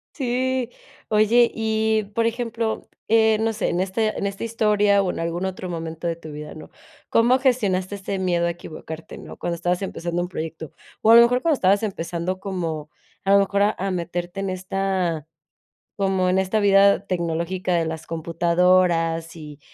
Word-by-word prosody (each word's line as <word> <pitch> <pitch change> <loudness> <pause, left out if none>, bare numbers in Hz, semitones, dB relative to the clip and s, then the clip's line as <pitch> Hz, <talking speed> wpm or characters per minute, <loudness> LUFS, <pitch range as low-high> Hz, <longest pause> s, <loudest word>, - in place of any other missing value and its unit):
Sí, 255 -2 -1 0.4
oye, 220 +3 +4
y, 220 0 +1
por 230 - +2
ejemplo, 230 -1 -2 0.2
eh, 220 -1 +4
no 225 - +1
sé, 215 -1 -2
en 180 - 0
este 215 +3 -1
en - - -2
esta 200 +3 -4
historia 210 -3 +3
o 185 - 0
en - - -6
algún 170 +2 -2
otro 190 -1 -4
momento 165 0 -5
de 165 - -1
tu 160 -2 -11
vida, 150 0 -8
¿no? 155 - -11 0.4
¿Cómo 240 +3 +4
gestionaste 205 -8 0
ese 195 0 -4
miedo 175 -2 +1
a - - 0
equivocarte? 160 -1 -9
¿No? - - -10
Cuando 170 -1 -3
estabas 175 +2 -1
empezando 175 -2 -3
un 180 - -4
proyecto, 160 -3 -6 0.3
o 220 - +5
a - - +9
lo - - +10
mejor 245 +2 +3
cuando 325 -3 +2
estabas 200 -1 +2
empezando 175 -2 -3
como 165 -6 -4 0.4
a 195 - +2
lo 200 - +7
mejor 200 0 +1
a 210 +1 +2
a 195 +1 -2
meterte 175 +1 -4
en 195 -1 -2
esta, 185 -4 -2 0.7
como 190 -2 +1
en 185 - +2
esta 190 +3 0
vida 200 0 +5
tecnológica 175 +1 -1
de 170 - +2
las 160 0 -5
computadoras 170 0 +1
y 150 -2 -10
185 Hz, 180 wpm, -23 LUFS, 170-215 Hz, 0.7 s, lo